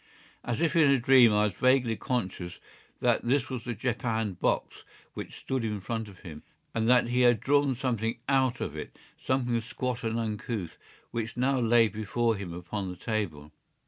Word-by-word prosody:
As 120 +5 -2
if 165 0 +1
in 155 -4 +6
a 140 - +5
dream 125 -1 +6
I 105 0 +3
was 105 - -1
vaguely 125 +1 +3
conscious 95 -8 -3 0.4
that - - +3
this 130 +2 +1
was 125 -3 -5
the 120 -2 -3
japanned 110 -4 -2
box - - -1 0.3
which - - -7
stood 130 -2 -2
in 105 -2 -2
front 110 +2 -4
of 95 -3 -15
him, 80 -5 -9 0.3
and 115 0 0
that 125 -1 +4
he 125 +1 +2
had 120 -3 +5
drawn 140 +1 +2
something 115 -3 -1
out 130 -2 +2
of 75 - -3
it, 75 - -8 0.2
something 125 -3 0
squat 125 +2 -4
and 115 0 -1
uncouth, 110 -4 -4 0.3
which 115 0 -4
now 130 +2 +2
lay 115 -1 +5
before 110 +2 -1
him 95 -4 -6
upon 90 +3 -5
the 90 - -6
table. 85 -10 -3
115 Hz, 180 wpm, -28 LUFS, 105-125 Hz, 0.4 s, in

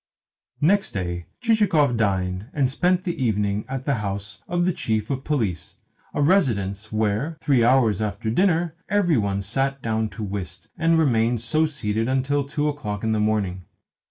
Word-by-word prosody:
Next 195 +6 +2
day 90 -3 -3
Chichikov 195 - +3
dined 95 -2 -1
and 135 -3 +1
spent 180 +5 +1
the 170 -7 -2
evening 105 -2 0
at 135 0 -4
the 140 - +1
house 100 -2 -4
of 175 0 0
the 185 - +2
Chief 110 -4 -2
of 135 -1 -2
Police 110 - -2 0.4
a 145 - +2
residence 110 - +1
where, 110 +9 -1
three 135 -7 +3
hours 115 -5 +3
after 110 +1 -2
dinner, 170 - +2 0.2
every 190 -7 +3
one 100 -1 -1
sat 135 +7 -1
down 110 -1 0
to 110 - -7
whist, 95 -3 -6
and 165 0 +2
remained 120 -6 +2
so 155 +7 +2
seated 115 -6 -2
until 135 +2 +1
two 145 +2 -2
o'clock 105 -9 -3
in 110 - +1
the 110 - +1
morning. 100 -4 0
115 Hz, 165 wpm, -23 LUFS, 105-150 Hz, 0.4 s, Chichikov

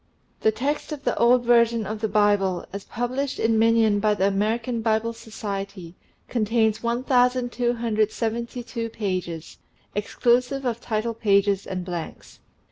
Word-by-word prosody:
The 220 - +3
text 285 +8 -2
of 295 -2 -6
the - - 0
old 240 +1 +4
version 235 -2 +4
of 215 +2 -5
the 220 - +1
Bible, 205 -3 +2
as 200 0 -6
published 255 +4 -2
in 225 0 +2
minion 225 -2 +4
by 210 0 +2
the 190 - +1
American 225 +4 0
Bible 225 +1 +1
Society, 200 -6 -6 0.3
contains 220 -1 +1
1272 240 -1 0
pages, 185 -7 -4 0.3
exclusive 245 +6 +1
of 235 -1 -2
title 225 +1 -2
pages 200 -3 +2
and 185 -1 -4
blanks. 175 -3 -7
225 Hz, 125 wpm, -24 LUFS, 205-240 Hz, 0.3 s, old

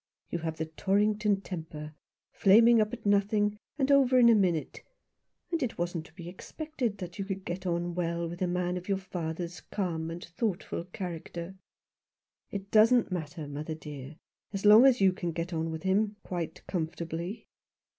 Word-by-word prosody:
You 170 - -1
have 160 -1 -4
the 160 - -2
Torrington 205 +4 +1
temper 160 -5 -7 0.2
— - - -64
flaming 225 +3 +7
up 215 0 0
at 240 -3 -8
nothing, 205 +1 +2 0.2
and 275 -1 +2
over 265 -2 +5
in 240 -2 +7
a - - +8
minute. 180 -7 +1 0.7
And 335 -1 0
it 245 -3 -2
wasn't 170 -1 -3
to - - -21
be 170 -2 -9
expected 245 - -4
that 180 +1 -7
you 195 - -2
could 195 -1 -5
get 185 +2 -4
on 175 0 -1
well 170 -1 -1
with 175 +2 -8
a 185 - +2
man 180 0 -1
of 180 +2 -8
your 195 - +2
father's 175 -2 -5
calm 165 -5 -3
and 170 +1 -6
thoughtful 175 -2 -3
character." 175 -1 -6 0.5
" - - -64 0.2
It 200 0 -6
doesn't 225 +1 +5
matter, 160 -3 -4
mother 150 +2 -5
dear, 150 -2 -9 0.4
as 195 0 -4
long 215 +5 +9
as 255 -4 +4
you 190 -1 +5
can 175 -2 -3
get 170 +2 -3
on 165 0 -1
with 160 -1 -5
him 205 +2 +2
— - - -48
quite 175 -3 -5
comfortably." 170 +2 -4
180 Hz, 185 wpm, -30 LUFS, 170-210 Hz, 0.7 s, long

